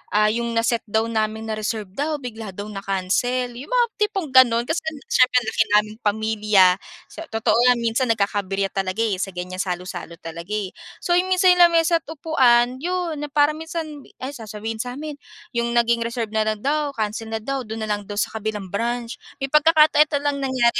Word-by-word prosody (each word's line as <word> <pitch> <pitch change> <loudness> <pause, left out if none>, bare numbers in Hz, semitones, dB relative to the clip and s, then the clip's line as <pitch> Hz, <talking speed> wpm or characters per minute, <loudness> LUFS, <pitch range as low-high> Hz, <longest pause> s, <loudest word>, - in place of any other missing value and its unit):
ah, 210 0 +5
yung 235 +1 -2
na-set 230 0 +1
daw 220 +2 +1
namin, 220 -1 -1
na-reserve 215 -2 -3
daw, 295 +9 -2
bigla 225 -5 -7
daw 205 +2 -6
na-cancel. 200 +6 -1
Yung 260 - -9
mga - - +4
tipong 390 -8 -1
ganon 240 -2 +6
kasi 320 - 0 0.3
siyempre 255 0 +4
ang 240 - -9
laki 225 - +3
naming 215 +1 +1
pamilya. 210 -2 +3 0.4
Sa 330 - -9
totoo 225 0 +1
nga, 250 - +6
minsan 235 +2 0
nagkaka-aberya 200 -2 -1
talaga 195 +3 -1
eh, 205 -5 -1
sa 195 +1 -2
ganyan 180 +1 -5
salo-salo 180 -2 -4
talaga 170 +3 -8
eh. 200 -3 -3 0.3
So, 350 - +2
yung 370 - -1
minsan 370 -1 +4
lamesa't 335 -1 +4
upuan, 260 -6 +2
'yon, 350 -1 -2
na 295 - -4
parang 295 +1 +2
minsan, 320 -3 -6 0.2
ay 265 - -3
sasabihin 220 -3 -6
sa 245 +1 -4
amin 295 0 -7 0.3
yung 235 -1 -1
naging 235 0 +3
reserve 230 -2 -3
na 220 0 +1
lang 215 -1 -2
daw, 290 +1 0
cancel 220 0 -3
na 220 - -2
daw, 270 +2 -3
do'n 220 +1 -6
na 215 - -4
lang 205 -1 -2
daw 205 - -7
sa 205 - 0
kabilang 210 -3 -4
branch. 235 +4 -3 0.2
May 270 - -2
pagkakata 305 0 +5
eto 300 -1 +4
lang 285 -1 0
nangyari 255 -3 +1
235 Hz, 190 wpm, -22 LUFS, 210-285 Hz, 0.4 s, ganon